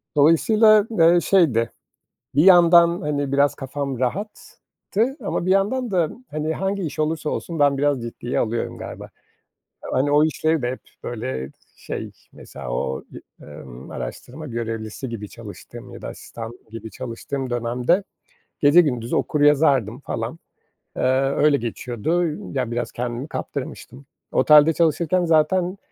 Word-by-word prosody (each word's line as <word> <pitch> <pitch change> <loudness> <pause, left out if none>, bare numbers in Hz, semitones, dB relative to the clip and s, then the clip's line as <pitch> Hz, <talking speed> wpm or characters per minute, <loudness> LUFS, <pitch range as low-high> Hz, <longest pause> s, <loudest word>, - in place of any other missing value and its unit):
Dolayısıyla, 210 +8 +5
eee, 170 +2 +6
şeydi, 145 - +2 0.6
bir 145 - +5
yandan, 170 -1 +6
hani, 145 -3 -2
biraz 140 +1 +3
kafam 135 -1 -4
rahattı 215 - -3
ama 175 - -2
bir 185 - +2
yandan 215 +5 +1
da, 175 -5 +2 0.2
hani, 155 +1 -2
hangi 195 +2 -2
iş 155 -2 -5
olursa 155 0 -1
olsun 165 -2 -4
ben 145 -1 +4
biraz 145 -2 +1
ciddiye 120 +1 -4
alıyorum 115 +1 -2
galiba. - - -8 0.8
Hani, 135 +3 +1
o 150 +1 +5
işleri 160 -1 0
de 120 - 0
hep, 130 - -6 0.2
böyle, 65 - -4 0.3
şey, - - -6 0.2
mesela 65 -3 -9
o, 65 +2 -3
i - - -14
emm, 65 -4 -11
araştırma 150 +5 -7
görevlisi 115 0 -5
gibi 110 -3 -6
çalıştığım - - -11
ya - - -11
da - - -5
asistan 115 +1 -9
gibi 115 0 -8
çalıştığım 130 +3 -5
dönemde 120 - 0 0.6
gece 145 +4 +7
gündüz 125 -7 -1
okur 150 - 0
yazardım, 140 -5 +3
falan. 115 +2 -5 0.6
Eee, - - -1 0.3
öyle 145 0 +3
geçiyordu. 120 +7 -2 0.3
Yani, 125 -3 -1
biraz 120 +1 -3
kendimi 120 +3 -4
kaptırmıştım. 140 -2 -7 0.3
Otelde 150 +1 +6
çalışırken 170 +2 +1
zaten, 175 +4 +2
145 Hz, 135 wpm, -22 LUFS, 120-170 Hz, 0.8 s, gece